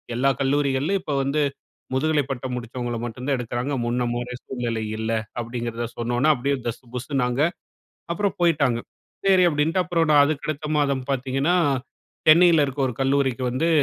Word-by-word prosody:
எல்லா 135 Hz, +3 st, +3 dB
கல்லூரிகள்லயும் 140 Hz, +6 st, +1 dB
இப்ப 145 Hz, -, -2 dB
வந்து 145 Hz, +3 st, 0 dB, 0.5 s
முதுகலை 150 Hz, +2 st, +2 dB
பட்டம் 130 Hz, -1 st, -4 dB
முடித்தவங்கள 120 Hz, 0 st, -4 dB
மட்டுந்தான் 125 Hz, +4 st, -2 dB
எடுக்கிறாங்க. 125 Hz, +3 st, -3 dB
முன்னமாரி 120 Hz, 0 st, -1 dB
சூழ்நிலை 120 Hz, -3 st, -3 dB
இல்ல. 110 Hz, +1 st, -2 dB, 0.3 s
அப்டிங்கிறத 120 Hz, 0 st, -4 dB
சொன்னவுன, 120 Hz, +5 st, +2 dB
அப்டியே 140 Hz, +3 st, 0 dB
தஸ் 115 Hz, -, -4 dB
புஸ்ஸூனாங்க. 125 Hz, 0 st, -1 dB, 0.7 s
அப்புறம் 200 Hz, +2 st, -1 dB
போயிட்டாங்க. 145 Hz, -8 st, +3 dB, 0.5 s
சரி 190 Hz, -2 st, +5 dB
அப்டின்ட்டு 160 Hz, +4 st, +1 dB
அப்புறம் 170 Hz, -2 st, +1 dB
நான் 145 Hz, -1 st, +7 dB
அதுக்கு 150 Hz, 0 st, -2 dB
அடுத்த 150 Hz, 0 st, -3 dB
மாதம் 140 Hz, -2 st, +1 dB
பார்த்தீங்கன்னா, 135 Hz, +5 st, 0 dB, 0.7 s
சென்னையில 165 Hz, -1 st, +7 dB
இருக்க 135 Hz, +1 st, -5 dB
ஒரு 125 Hz, -, -4 dB
கல்லூரிக்கு 135 Hz, -1 st, +1 dB
வந்து, 145 Hz, +7 st, 0 dB
135 Hz, 140 wpm, -23 LUFS, 120-150 Hz, 0.7 s, நான்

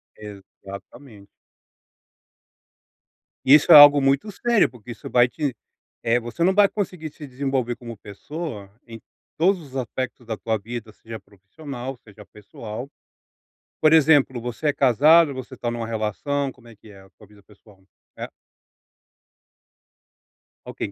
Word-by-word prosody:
Exatamente. 100 Hz, +2 st, -13 dB, 2.2 s
Isso 145 Hz, +3 st, +6 dB
é -, -, +11 dB
algo 145 Hz, -1 st, +9 dB
muito 135 Hz, +9 st, +1 dB
sério 235 Hz, +2 st, +1 dB
porque 120 Hz, -1 st, -13 dB
isso 115 Hz, -, -10 dB
vai 125 Hz, 0 st, +4 dB
te, 130 Hz, +1 st, -4 dB, 0.5 s
eh, 115 Hz, +1 st, +2 dB
você 120 Hz, +8 st, -4 dB
não 190 Hz, -, +3 dB
vai 205 Hz, 0 st, +5 dB
conseguir 180 Hz, -7 st, -5 dB
se 150 Hz, -, -11 dB
desenvolver 130 Hz, -2 st, -3 dB
como 115 Hz, -2 st, -10 dB
pessoa 105 Hz, -, -8 dB, 0.2 s
em 115 Hz, -1 st, -11 dB, 0.4 s
todos 185 Hz, +3 st, +2 dB
os 135 Hz, -4 st, -14 dB
aspectos 130 Hz, +1 st, -5 dB
da 110 Hz, -, -3 dB
tua 110 Hz, -1 st, -2 dB
vida 110 Hz, +1 st, -8 dB
seja 110 Hz, +1 st, -11 dB
profissional 125 Hz, -, -10 dB
seja 105 Hz, -1 st, -16 dB
pessoal. 110 Hz, +4 st, -10 dB, 0.9 s
Por 155 Hz, 0 st, +5 dB
exemplo 145 Hz, -5 st, +4 dB
você 120 Hz, +6 st, -5 dB
é 145 Hz, -, +2 dB
casado 145 Hz, +4 st, +4 dB
você 130 Hz, 0 st, -9 dB
está 120 Hz, -, -4 dB
numa 120 Hz, -1 st, -4 dB
relação 115 Hz, +6 st, -3 dB
como 125 Hz, -2 st, -20 dB
é 115 Hz, -, -15 dB
que 105 Hz, +1 st, -19 dB
é 100 Hz, -2 st, -15 dB
a 95 Hz, -, -20 dB
tua 105 Hz, -, -20 dB
vida 105 Hz, -1 st, -21 dB
pessoal? 100 Hz, -1 st, -22 dB, 0.3 s
É? -, -, -6 dB, 2.4 s
Ok, -, -, -6 dB
125 Hz, 140 wpm, -22 LUFS, 110-145 Hz, 2.4 s, é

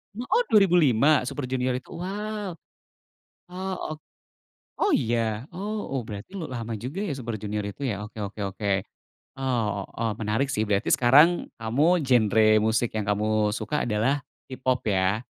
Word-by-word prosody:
M 240 Hz, -, -4 dB
oh 485 Hz, +1 st, +3 dB
2005 155 Hz, -, +5 dB
Super 135 Hz, 0 st, -4 dB
Junior 130 Hz, 0 st, 0 dB
itu? 130 Hz, -, -12 dB
Wow. 205 Hz, +1 st, -4 dB, 1.0 s
Oh, 190 Hz, +1 st, -4 dB, 0.2 s
ok -, -, -27 dB, 0.8 s
oh -, -, +2 dB
iya? 115 Hz, 0 st, 0 dB
Oh 205 Hz, -5 st, -4 dB
oh 125 Hz, -, -1 dB
berarti 105 Hz, -, -8 dB
lama 120 Hz, -8 st, -5 dB
juga 135 Hz, -, -5 dB
ya 180 Hz, -, -2 dB
Super 115 Hz, -3 st, -4 dB
Junior 105 Hz, -1 st, -3 dB
itu 100 Hz, +7 st, -7 dB
ya? 105 Hz, -4 st, -2 dB
Oke 105 Hz, 0 st, -8 dB
oke 100 Hz, +1 st, -5 dB
oke. 100 Hz, 0 st, -2 dB, 0.6 s
Eee, 130 Hz, -4 st, -1 dB
o 95 Hz, -, -8 dB
oh, 115 Hz, -1 st, -2 dB
menarik 110 Hz, +6 st, 0 dB
sih, 110 Hz, -4 st, -1 dB
berarti 100 Hz, -1 st, +1 dB
sekarang, 150 Hz, +8 st, +5 dB
kamu 145 Hz, +9 st, +2 dB
genre 110 Hz, -4 st, +4 dB
musik 110 Hz, +2 st, +1 dB
yang 105 Hz, -2 st, -3 dB
kamu 105 Hz, +1 st, +1 dB
suka 120 Hz, +6 st, -2 dB
adalah 115 Hz, +7 st, +1 dB, 0.2 s
K-Pop 130 Hz, -1 st, -2 dB
ya? 100 Hz, +2 st, +1 dB
125 Hz, 155 wpm, -26 LUFS, 110-155 Hz, 1.0 s, 2005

